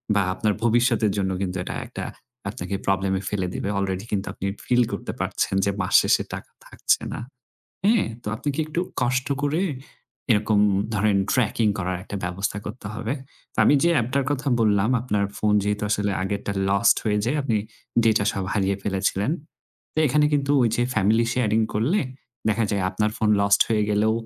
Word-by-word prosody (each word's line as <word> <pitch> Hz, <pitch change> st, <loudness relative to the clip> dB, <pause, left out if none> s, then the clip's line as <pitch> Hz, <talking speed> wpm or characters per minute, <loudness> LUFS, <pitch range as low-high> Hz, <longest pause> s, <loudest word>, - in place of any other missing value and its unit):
বা 100 Hz, -, +4 dB
আপনার 105 Hz, +2 st, 0 dB
ভবিষ্যতের 120 Hz, -2 st, +3 dB
জন্য 95 Hz, -1 st, 0 dB
কিন্তু 95 Hz, -1 st, -2 dB
এটা -, -, -5 dB
একটা -, -, -6 dB, 0.5 s
আপনাকে 90 Hz, +3 st, -4 dB
প্রবলেমে 95 Hz, 0 st, +1 dB
ফেলে 95 Hz, -3 st, -1 dB
দিবে। -, -, -3 dB
অলরেডি 95 Hz, 0 st, -2 dB
কিন্তু 100 Hz, -1 st, -1 dB
আপনি -, -, -6 dB, 0.2 s
ফিল 125 Hz, 0 st, +4 dB
করতে -, -, -4 dB
পারছেন -, -, -1 dB
যে 100 Hz, -, +2 dB
মাস 90 Hz, -, -3 dB
শেষে -, -, +2 dB
টাকা -, -, -7 dB
থাকছে -, -, 0 dB
না। -, -, -5 dB, 0.7 s
হ্যাঁ? 220 Hz, +3 st, +4 dB, 0.2 s
তো -, -, -19 dB
আপনি 145 Hz, -, -4 dB
কি 155 Hz, -, -1 dB
একটু 155 Hz, +2 st, -2 dB, 0.2 s
কষ্ট 130 Hz, +1 st, +1 dB, 0.2 s
করে 150 Hz, +5 st, +1 dB, 0.7 s
এরকম 105 Hz, -1 st, +3 dB, 0.4 s
ধরেন 105 Hz, 0 st, +2 dB, 0.2 s
ট্র্যাকিং 115 Hz, -2 st, +2 dB
করার 90 Hz, 0 st, -1 dB
একটা 100 Hz, -, -6 dB
ব্যবস্থা 95 Hz, +3 st, -2 dB
করতে 105 Hz, 0 st, -7 dB
হবে। 115 Hz, +2 st, -3 dB, 0.4 s
তো -, -, -17 dB
আমি -, -, +5 dB
যে 170 Hz, -, +4 dB
অ্যাপটার 130 Hz, +2 st, +1 dB
কথা 145 Hz, 0 st, -1 dB
বললাম 105 Hz, 0 st, +3 dB
আপনার 105 Hz, -4 st, 0 dB
ফোন 105 Hz, 0 st, +2 dB
যেহেতু 105 Hz, +1 st, -1 dB
আসলে 105 Hz, -1 st, +1 dB
আগেরটা 100 Hz, +1 st, -2 dB, 0.2 s
লস্ট 100 Hz, +3 st, +4 dB
হয়ে 105 Hz, -2 st, +1 dB
যায় 125 Hz, +6 st, 0 dB
আপনি 115 Hz, -5 st, 0 dB, 0.5 s
ডেটা 110 Hz, -2 st, +3 dB
সব 95 Hz, -, -3 dB
হারিয়ে 100 Hz, -2 st, +1 dB
ফেলেছিলেন। 100 Hz, +3 st, 0 dB, 0.6 s
তো -, -, -2 dB
এখানে 150 Hz, +2 st, +3 dB
কিন্তু 140 Hz, -1 st, +1 dB
ওই 120 Hz, -, +4 dB
যে 120 Hz, -, +2 dB
ফ্যামিলি 110 Hz, +3 st, +3 dB
শেয়ারিং 110 Hz, -3 st, +1 dB
করলে 135 Hz, -, +2 dB, 0.5 s
দেখা 110 Hz, +1 st, +2 dB
যায় 100 Hz, -2 st, 0 dB
আপনার 105 Hz, +3 st, 0 dB
ফোন 110 Hz, -1 st, +1 dB
লস্ট 100 Hz, 0 st, +4 dB
হয়ে 110 Hz, -2 st, +2 dB
গেলেও 105 Hz, +1 st, +2 dB
105 Hz, 180 wpm, -24 LUFS, 100-120 Hz, 0.7 s, আমি